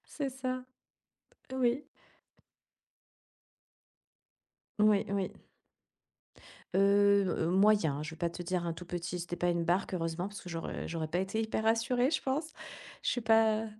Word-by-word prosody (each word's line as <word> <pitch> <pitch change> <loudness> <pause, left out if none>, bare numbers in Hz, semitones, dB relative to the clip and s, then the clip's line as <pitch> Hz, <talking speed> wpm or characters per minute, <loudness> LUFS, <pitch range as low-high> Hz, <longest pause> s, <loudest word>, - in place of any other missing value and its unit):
C'est 280 -3 -4
ça. 255 -1 -4 0.9
Oui. 255 +2 +1 3.0
Oui, 210 -1 +4
oui. 195 -1 -1 1.4
Heu 200 +1 +5
heu, 165 -1 0
moyen, 185 -7 +3
je 155 - -5
vais 160 - -10
pas 170 +1 -1
te 175 - -7
dire 175 0 -1
un 165 - -1
tout 170 +1 -9
petit, 175 0 -4
c'était 175 +1 -5
pas 175 +1 +1
une 170 -1 0
barque 180 +3 +1
heureusement 165 +1 -2
parce 205 - -9
que 180 - -10
j'aurais 165 -1 -4
j'aurais 160 -1 -2
pas 175 - -1
été 195 +4 -1
hyper 220 0 -2
rassurée 245 +4 +2
je 320 - 0
pense. 295 +4 -2 0.5
Je - - +1
suis 245 - -1
pas 225 -1 +3
200 Hz, 150 wpm, -32 LUFS, 175-225 Hz, 3.0 s, Heu